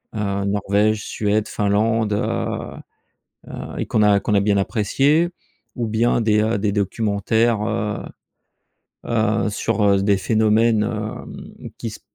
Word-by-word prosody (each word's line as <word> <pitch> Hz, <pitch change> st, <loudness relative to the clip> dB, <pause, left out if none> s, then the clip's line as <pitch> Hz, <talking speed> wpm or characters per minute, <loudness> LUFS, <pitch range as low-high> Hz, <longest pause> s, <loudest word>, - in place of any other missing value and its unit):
Heu, 100 Hz, -2 st, -2 dB
Norvège, 105 Hz, +2 st, +1 dB
Suède, 105 Hz, 0 st, -1 dB
Finlande, 105 Hz, +1 st, +1 dB
heu 105 Hz, -, -4 dB, 0.5 s
heu, -, -, -7 dB
et -, -, -2 dB
qu'on 110 Hz, -, +1 dB
a 105 Hz, -1 st, +4 dB
qu'on 105 Hz, -, -1 dB
a 100 Hz, -, +4 dB
bien 100 Hz, 0 st, +2 dB
appréciées 135 Hz, -, +2 dB, 0.5 s
ou 120 Hz, -2 st, -1 dB
bien 115 Hz, +2 st, +1 dB
des, 110 Hz, -1 st, +2 dB
heu, 110 Hz, 0 st, 0 dB
des 100 Hz, 0 st, 0 dB
documentaires, 105 Hz, +2 st, 0 dB
heu 105 Hz, -1 st, -2 dB, 1.1 s
heu, 110 Hz, -1 st, +1 dB
sur, 105 Hz, +1 st, -1 dB
heu, 100 Hz, -1 st, +3 dB
des 100 Hz, 0 st, +3 dB
phénomènes, 110 Hz, +2 st, +2 dB
hem, 110 Hz, -1 st, -6 dB
qui 115 Hz, -, -4 dB
s 110 Hz, -, -9 dB
105 Hz, 140 wpm, -21 LUFS, 100-110 Hz, 1.1 s, a